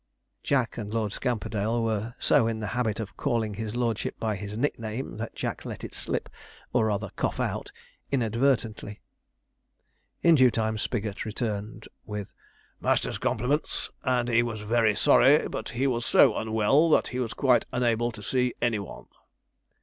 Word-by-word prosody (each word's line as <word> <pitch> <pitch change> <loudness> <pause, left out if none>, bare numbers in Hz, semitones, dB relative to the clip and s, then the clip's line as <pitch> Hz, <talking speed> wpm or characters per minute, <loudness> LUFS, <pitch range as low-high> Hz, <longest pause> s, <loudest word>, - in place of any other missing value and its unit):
Jack 130 -4 0
and 105 -2 -5
Lord 110 -2 -1
Scamperdale 110 -1 -1
were 110 +1 -2
so 115 - +3
in 115 -1 -2
the 110 - -3
habit 120 -4 0
of 110 -3 -6
calling 115 -6 -1
his 110 +2 -5
lordship 115 -3 -1
by 110 -2 -1
this 100 +1 -6
nickname, 115 -3 -3
that 110 +1 -5
Jack - - -4
let - - -7
it - - -7
slip, - - -3 0.5
or 115 -3 +3
rather 100 -2 -2
cough - - -1
out, - - -2 0.4
inadvertently. 115 -4 0 1.2
In 170 - +7
due 130 -5 +6
time 110 -1 -1
Spigot 105 -4 -2
returned, 110 -1 -4 0.2
with 105 -2 -6 0.5
'Master's - - 0
compliments, 135 +7 -1
and 125 -3 +1
he 120 -1 +4
was 115 -3 -3
very 110 0 +2
sorry, - - +5
but - - -5
he 125 +4 -1
was 120 -3 0
so 120 -1 +5
unwell 110 +9 +3
that - - +3
he 125 - -4
was 120 -3 -2
quite 130 -3 +3
unable 120 -1 +1
to 110 -2 -10
see 125 +2 0
any 115 -3 +1
one.' 100 - -9
115 Hz, 160 wpm, -27 LUFS, 110-125 Hz, 1.2 s, In